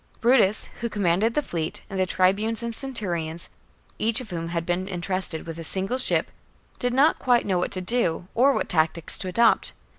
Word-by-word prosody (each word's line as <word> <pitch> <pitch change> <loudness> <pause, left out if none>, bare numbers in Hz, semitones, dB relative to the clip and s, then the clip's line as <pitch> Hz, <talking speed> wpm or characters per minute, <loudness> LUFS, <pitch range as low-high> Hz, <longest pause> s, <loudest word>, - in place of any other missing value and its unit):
Brutus, 230 -4 +3
who 235 -1 -2
commanded 205 +2 +1
the 295 - +1
fleet, 165 - -4
and 195 -2 -5
the 185 - +1
tribunes 205 +6 +1
and 235 0 -3
cen 270 +3 -2
turions, 170 -6 -2 0.5
each 225 0 +1
of 245 -6 -9
whom 165 -1 -4
had 170 0 -3
been 180 +2 -1
entrusted 185 -2 -3
with 165 0 -7
a - - -5
single 195 +9 0
ship, - - +4 0.5
did 245 - 0
not 275 +5 +3
quite 245 -2 +2
know 185 -3 0
what 180 - -1
to 185 - -3
do, 185 -4 0
or 265 +4 +4
what - - -1
tactics 160 0 0
to 190 - -5
adopt. 230 +5 +2
190 Hz, 200 wpm, -24 LUFS, 175-235 Hz, 0.5 s, ship